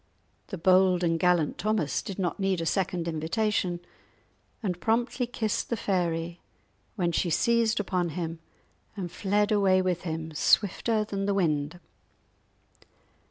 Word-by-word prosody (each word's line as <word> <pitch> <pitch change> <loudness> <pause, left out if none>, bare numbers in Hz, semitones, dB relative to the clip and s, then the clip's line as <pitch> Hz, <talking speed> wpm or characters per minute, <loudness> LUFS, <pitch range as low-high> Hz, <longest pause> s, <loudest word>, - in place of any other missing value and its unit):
The 195 - -6
bold 185 +1 +4
and 165 -1 +1
gallant 175 -4 +2
Thomas 215 -9 0
did 195 - -7
not 185 -1 -2
need 195 -2 +1
a 165 - -2
second 180 -1 -1
invitation, 175 +2 -1 0.8
and 180 -4 -2
promptly 240 +2 0
kissed 220 -3 -2
the 235 - -1
fairy, 170 -3 -1 0.6
when 175 -4 0
she 170 - 0
seized 230 +5 +2
upon 180 -3 -1
him 165 -1 -3 0.6
and 180 -3 -4
fled 205 +3 +1
away 195 -3 +4
with 185 -2 0
him 160 -1 -4
swifter 215 +7 +2
than 200 -2 -3
the 200 - +1
wind. 160 -2 0
185 Hz, 135 wpm, -27 LUFS, 170-205 Hz, 0.8 s, bold